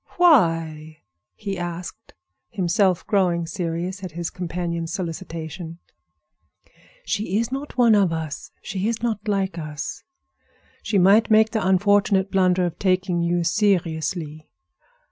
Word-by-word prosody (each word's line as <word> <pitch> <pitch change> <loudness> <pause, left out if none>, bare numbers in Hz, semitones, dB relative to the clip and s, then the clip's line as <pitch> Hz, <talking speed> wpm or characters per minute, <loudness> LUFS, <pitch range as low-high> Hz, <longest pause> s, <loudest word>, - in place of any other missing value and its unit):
"Why?" 165 - +2 0.3
he 200 -3 -5
asked; 175 0 -7 0.3
himself 185 -2 +1
growing 180 -4 +1
serious 175 +3 -4
at 180 -4 -6
his 170 0 -4
companion's 170 -2 -4
solicitation. 165 -2 -6 1.3
"She 205 -2 -1
is 230 +2 -1
not 275 +2 -5
one 235 -3 +5
of 200 -4 +4
us; 160 -2 -5
she 195 +1 -2
is 230 0 -2
not 220 -2 -2
like 195 -4 -1
us. 150 -2 -6 0.8
She 210 - 0
might 195 +4 +5
make 220 0 +5
the 220 -3 -1
unfortunate 195 +1 +3
blunder 185 -1 +3
of 170 -2 -5
taking 185 -2 +1
you 170 0 +1
seriously." 165 -5 -1
185 Hz, 125 wpm, -23 LUFS, 165-205 Hz, 1.3 s, one